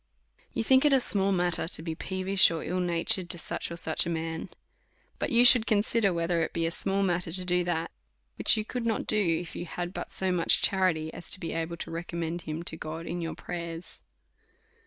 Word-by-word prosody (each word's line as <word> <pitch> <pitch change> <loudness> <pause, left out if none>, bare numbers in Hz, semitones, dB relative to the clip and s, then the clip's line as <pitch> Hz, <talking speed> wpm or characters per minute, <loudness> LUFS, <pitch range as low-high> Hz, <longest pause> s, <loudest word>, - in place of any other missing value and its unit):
You 230 - -2
think 260 +3 +4
it 295 -2 +4
a 270 - +5
small 200 -5 +1
matter 175 -3 0
to 165 - +2
be 165 -1 -3
peevish 190 +3 +2
or 165 -2 -4
ill 180 +2 -2
natured 175 +2 0
to 175 - -1
such - - -3
or 170 - -7
such 160 -2 +1
a - - -3
man; 165 -1 -4 0.7
but - - -1
you 240 +1 +5
should 245 -2 +7
consider, 215 0 +2
vvhetlier 170 -1 0
it - - -4
be 165 -1 0
a 165 - -1
small 195 +3 0
matter 175 -2 -1
to 185 +1 -2
do 180 0 +1
that, 170 -1 -2 0.4
which - - +5
you 215 - -2
could 240 0 -4
not 225 - -1
do, 210 -1 +4
if 165 -1 -1
you 175 - -5
had 175 +2 -5
but - - -6
so 190 -1 -1
much 175 -2 +3
charity 175 -5 +1
as 170 - -9
to - - +4
be 165 - -5
able 165 +1 -3
to - - -7
recommend 170 0 -4
him 155 +1 -5
to 165 - -3
God 160 +1 -7
in 175 +1 -4
your 165 - -4
prayers. 170 -1 -7
175 Hz, 220 wpm, -28 LUFS, 165-195 Hz, 0.7 s, should